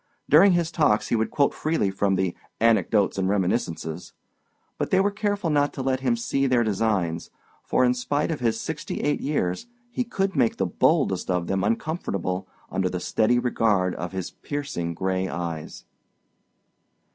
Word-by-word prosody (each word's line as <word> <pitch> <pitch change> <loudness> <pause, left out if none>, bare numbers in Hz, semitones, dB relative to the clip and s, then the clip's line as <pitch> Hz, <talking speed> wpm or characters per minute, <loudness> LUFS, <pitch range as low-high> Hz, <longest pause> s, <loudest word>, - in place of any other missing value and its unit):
During 180 +6 +7
his 170 -1 +1
talks 150 -10 +2
he - - +2
would 110 0 0
quote 140 -1 +2
freely 155 -11 0
from 95 0 +1
the 95 -1 -1 0.2
Anecdotes 110 -3 +2
and 95 0 +1
Reminiscences. 90 -4 -2 0.7
But - - -1
they 190 - +3
were 200 +1 +2
very - - -20
careful 205 -5 0
not 145 -1 +2
to 135 - -4
let 130 0 0
him 125 -3 +1
see 135 +4 0
their 125 -2 +3
designs, 95 -6 0 0.3
for 125 - +2
in 125 - +3
spite 145 +6 -1
of 155 - -3
his 115 -2 0
sixty 160 -1 -4
eight 145 0 0
years 115 - -1 0.2
he 250 - -1
could 195 -4 -2
make 230 -2 +2
the - - +1
boldest 140 - +1
of 90 -2 0
them 95 +1 -1
uncomfortable 100 - -2 0.2
under 95 -1 0
the 90 - -3
steady 110 +6 +2
regard 110 -7 +1
of 90 - -5
his 95 -2 -4
piercing 140 - -4
gray 95 +1 -1
eyes. 85 -3 -5
115 Hz, 170 wpm, -25 LUFS, 95-145 Hz, 0.7 s, During